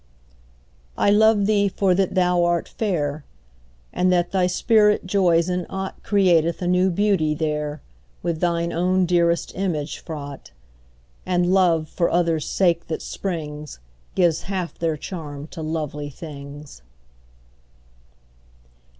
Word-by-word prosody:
I 200 Hz, -, +3 dB
love 215 Hz, -1 st, +4 dB
thee 205 Hz, -1 st, +3 dB
for 190 Hz, -1 st, +1 dB
that 190 Hz, +1 st, 0 dB
thou 180 Hz, -1 st, +3 dB
art 175 Hz, -1 st, +1 dB
fair; 155 Hz, -8 st, -2 dB, 0.7 s
And 185 Hz, 0 st, +2 dB
that 175 Hz, -1 st, +1 dB
thy 185 Hz, -2 st, +2 dB
spirit 210 Hz, +3 st, +3 dB
joys 180 Hz, -3 st, +2 dB
in 180 Hz, -1 st, -2 dB
aught 190 Hz, 0 st, -5 dB
Createth 175 Hz, -5 st, +2 dB
a -, -, -1 dB
new 180 Hz, +1 st, +3 dB
beauty 185 Hz, -5 st, +1 dB
there, 150 Hz, -1 st, -3 dB, 0.4 s
With 170 Hz, -2 st, -1 dB
throe 170 Hz, -1 st, 0 dB
own 185 Hz, +2 st, +2 dB
dearest 170 Hz, -1 st, +1 dB
image 165 Hz, -6 st, -3 dB
fraught; 145 Hz, -4 st, -8 dB, 0.7 s
And 180 Hz, 0 st, +1 dB
love, 170 Hz, -5 st, +3 dB
for 170 Hz, +1 st, 0 dB
others' 165 Hz, -3 st, +1 dB
sake 170 Hz, -3 st, +1 dB
that 160 Hz, -, -4 dB
springs, 150 Hz, -5 st, -5 dB, 0.4 s
Gives 170 Hz, -4 st, +2 dB
half 185 Hz, -3 st, -3 dB
their 165 Hz, -2 st, -1 dB
charm 145 Hz, -4 st, -7 dB
to 165 Hz, -, -8 dB
lovely 150 Hz, -2 st, -4 dB
things. 145 Hz, -, -10 dB
175 Hz, 125 wpm, -22 LUFS, 155-185 Hz, 0.7 s, love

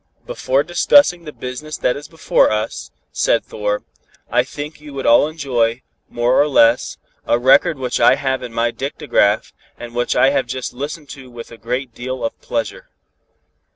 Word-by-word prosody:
"Before 135 Hz, +2 st, 0 dB
discussing 175 Hz, -, +3 dB
the 150 Hz, -, -7 dB
business 145 Hz, +4 st, -7 dB
that 125 Hz, -, 0 dB
is 145 Hz, +2 st, -8 dB
before 160 Hz, -1 st, +2 dB
us," 110 Hz, +1 st, -3 dB, 0.2 s
said -, -, +1 dB
Thor, 105 Hz, 0 st, -3 dB, 0.5 s
"I -, -, +3 dB
think 150 Hz, +1 st, -8 dB
you 150 Hz, -2 st, -11 dB
would 135 Hz, -, -4 dB
all 120 Hz, +5 st, +5 dB
enjoy, 125 Hz, -6 st, -1 dB, 0.3 s
more 120 Hz, +3 st, +2 dB
or 145 Hz, -, +2 dB
less, 120 Hz, -4 st, +3 dB, 0.3 s
a -, -, +3 dB
record 135 Hz, +6 st, +4 dB
which 125 Hz, -2 st, -2 dB
I -, -, +6 dB
have 130 Hz, -2 st, -2 dB
in 125 Hz, -2 st, -7 dB
my 115 Hz, +1 st, 0 dB
dictagraph, 135 Hz, -6 st, 0 dB, 0.2 s
and 120 Hz, -1 st, -9 dB
which 120 Hz, 0 st, -1 dB
I 135 Hz, -, +4 dB
have 135 Hz, -3 st, 0 dB
just 130 Hz, +1 st, -5 dB
listened 145 Hz, +3 st, -6 dB
to 130 Hz, -2 st, -10 dB
with 120 Hz, -1 st, -10 dB
a 115 Hz, -, -11 dB
great 125 Hz, +2 st, -4 dB
deal 130 Hz, +1 st, -5 dB
of 115 Hz, -, -3 dB
pleasure." -, -, -4 dB
130 Hz, 175 wpm, -19 LUFS, 120-150 Hz, 0.5 s, I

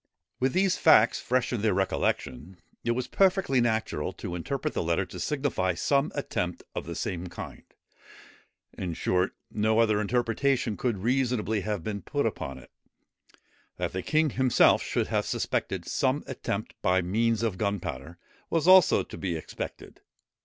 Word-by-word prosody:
With 130 Hz, 0 st, +1 dB
these 190 Hz, 0 st, +2 dB
facts 120 Hz, -8 st, +5 dB
fresh 125 Hz, 0 st, 0 dB
in 115 Hz, -, -1 dB
their 105 Hz, -3 st, +2 dB
recollection, 90 Hz, -3 st, -1 dB, 0.3 s
it 120 Hz, -, +1 dB
was 125 Hz, +1 st, -3 dB
perfectly 190 Hz, -9 st, +3 dB
natural 110 Hz, -9 st, -1 dB
to -, -, -6 dB
interpret 130 Hz, -, -3 dB
the -, -, -1 dB
letter 85 Hz, +3 st, 0 dB
to 90 Hz, -, -9 dB
signify 95 Hz, -, -1 dB
some 140 Hz, -, +1 dB
attempt 90 Hz, -11 st, -3 dB
of -, -, -5 dB
the -, -, -5 dB
same 90 Hz, 0 st, -3 dB
kind. 85 Hz, -, -8 dB, 1.1 s
In 85 Hz, -3 st, -4 dB
short, 90 Hz, +3 st, 0 dB, 0.2 s
no 110 Hz, +1 st, +1 dB
other 110 Hz, -2 st, +3 dB
interpretation 120 Hz, +1 st, 0 dB
could 120 Hz, 0 st, -1 dB
have 95 Hz, -, -9 dB
reasonably 120 Hz, -4 st, +1 dB, 0.2 s
been 100 Hz, 0 st, -4 dB
put -, -, -1 dB
upon 65 Hz, -, -3 dB
it. -, -, -15 dB, 1.1 s
That 90 Hz, -1 st, -2 dB
the 95 Hz, -, -2 dB
king 155 Hz, -, +2 dB
himself 130 Hz, -1 st, +4 dB
should -, -, -1 dB
have -, -, 0 dB
suspected 90 Hz, -3 st, -2 dB
some 135 Hz, +6 st, 0 dB
attempt 110 Hz, -5 st, -4 dB
by 90 Hz, -1 st, +2 dB
means 115 Hz, +5 st, +1 dB
of 105 Hz, -5 st, -1 dB
gunpowder 90 Hz, -6 st, -3 dB, 0.3 s
was 165 Hz, 0 st, 0 dB
also 185 Hz, -2 st, +7 dB
to -, -, -10 dB
be 90 Hz, -4 st, -2 dB
expected. 80 Hz, -, -7 dB
110 Hz, 155 wpm, -28 LUFS, 90-130 Hz, 1.1 s, also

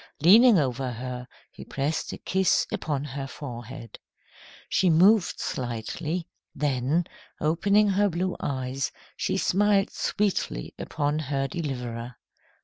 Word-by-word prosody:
Leaning 215 Hz, -, +7 dB
over 130 Hz, -3 st, 0 dB
her, 125 Hz, +1 st, -6 dB, 0.2 s
he -, -, -10 dB
pressed 145 Hz, +3 st, -2 dB
a -, -, -6 dB
kiss 190 Hz, -1 st, +2 dB
upon 145 Hz, -3 st, -2 dB
her 140 Hz, -1 st, -5 dB
forehead. 120 Hz, -4 st, -8 dB, 0.7 s
She 185 Hz, -, +2 dB
moved 185 Hz, +4 st, +4 dB
slightly; 150 Hz, +8 st, -3 dB, 0.3 s
then, 145 Hz, +3 st, +1 dB, 0.3 s
opening 200 Hz, +7 st, +3 dB
her 200 Hz, +1 st, +3 dB
blue 180 Hz, +1 st, -1 dB
eyes, 130 Hz, 0 st, -2 dB, 0.2 s
she 190 Hz, -, -1 dB
smiled 200 Hz, +1 st, +2 dB
sweetly 200 Hz, -, -1 dB
upon 150 Hz, 0 st, -1 dB
her 135 Hz, -2 st, -1 dB
deliverer. 125 Hz, -7 st, -4 dB
150 Hz, 115 wpm, -26 LUFS, 130-185 Hz, 0.7 s, Leaning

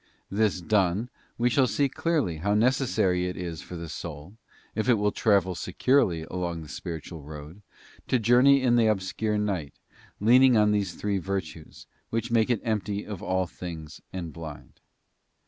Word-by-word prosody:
This 100 Hz, -2 st, +1 dB
done, 105 Hz, +3 st, +1 dB, 0.3 s
we 120 Hz, -, +2 dB
shall 130 Hz, 0 st, +4 dB
see 140 Hz, +3 st, +1 dB
clearly 140 Hz, -, -1 dB
how 100 Hz, +6 st, 0 dB
necessary 105 Hz, -7 st, +2 dB
it 90 Hz, -, -5 dB
is 85 Hz, -3 st, -5 dB
for 90 Hz, -, -9 dB
the 85 Hz, 0 st, -6 dB
soul, 80 Hz, +2 st, -7 dB, 0.4 s
if 110 Hz, +3 st, -1 dB
it 120 Hz, -, +6 dB
will 105 Hz, -1 st, +1 dB
travel 100 Hz, -4 st, +2 dB
securely 90 Hz, -, +1 dB
along 85 Hz, -1 st, -4 dB
the 75 Hz, -, -12 dB
spiritual 80 Hz, -1 st, -6 dB
road, 75 Hz, +5 st, -10 dB, 0.5 s
to 130 Hz, -, +3 dB
journey 125 Hz, +4 st, +5 dB
in 120 Hz, -2 st, +4 dB
the 115 Hz, -2 st, +4 dB
obscure 105 Hz, +1 st, 0 dB
night, 95 Hz, -8 st, -2 dB, 0.4 s
leaning 125 Hz, +3 st, +6 dB
on 105 Hz, 0 st, +4 dB
these 100 Hz, -4 st, 0 dB
three 100 Hz, -1 st, -1 dB
virtues, 90 Hz, -4 st, -5 dB, 0.2 s
which 115 Hz, +1 st, -2 dB
make 115 Hz, -1 st, +3 dB
it 120 Hz, -4 st, +1 dB
empty 105 Hz, -2 st, -2 dB
of 105 Hz, -4 st, -7 dB
all 95 Hz, 0 st, 0 dB
things 85 Hz, -3 st, -8 dB
and 85 Hz, -4 st, -5 dB
blind. 80 Hz, -3 st, -10 dB
100 Hz, 165 wpm, -27 LUFS, 85-115 Hz, 0.5 s, it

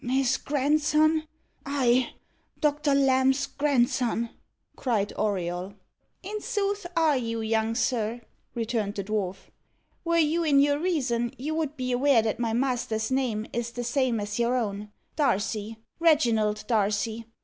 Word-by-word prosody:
"His 260 Hz, +1 st, +1 dB
grandson! 305 Hz, +2 st, +2 dB, 0.4 s
I 260 Hz, -4 st, +1 dB, 0.5 s
Doctor 295 Hz, -1 st, +2 dB
Lamb's 265 Hz, 0 st, +3 dB
grandson!" 245 Hz, -4 st, 0 dB, 0.4 s
cried 215 Hz, -6 st, -1 dB
Auriol. 185 Hz, -2 st, -2 dB, 0.5 s
"In 420 Hz, +3 st, -5 dB
sooth 410 Hz, -4 st, -2 dB
are 320 Hz, -3 st, +4 dB
you, 230 Hz, -2 st, -2 dB
young 220 Hz, 0 st, 0 dB
sir," 230 Hz, -1 st, -1 dB, 0.3 s
returned 225 Hz, -3 st, -2 dB
the 200 Hz, -, -3 dB
dwarf. 195 Hz, -2 st, -3 dB, 0.5 s
"Were 335 Hz, 0 st, +1 dB
you 330 Hz, +1 st, +2 dB
in 290 Hz, -3 st, +4 dB
your 285 Hz, +1 st, +3 dB
reason, 265 Hz, -8 st, -1 dB
you 295 Hz, +5 st, -3 dB
would 310 Hz, -2 st, -2 dB
be 255 Hz, -1 st, -2 dB
aware 250 Hz, -2 st, +4 dB
that 220 Hz, +1 st, -2 dB
my 230 Hz, -2 st, 0 dB
master's 235 Hz, -2 st, -1 dB
name 245 Hz, -5 st, 0 dB
is 235 Hz, 0 st, -2 dB
the 240 Hz, +1 st, -5 dB
same 245 Hz, -1 st, +1 dB
as 205 Hz, +2 st, -4 dB
your 240 Hz, +1 st, +2 dB
own 210 Hz, -3 st, -3 dB, 0.2 s
Darcy 220 Hz, -5 st, 0 dB, 0.2 s
Reginald 230 Hz, -10 st, +3 dB
Darcy. 220 Hz, +1 st, 0 dB
245 Hz, 135 wpm, -27 LUFS, 220-290 Hz, 0.5 s, are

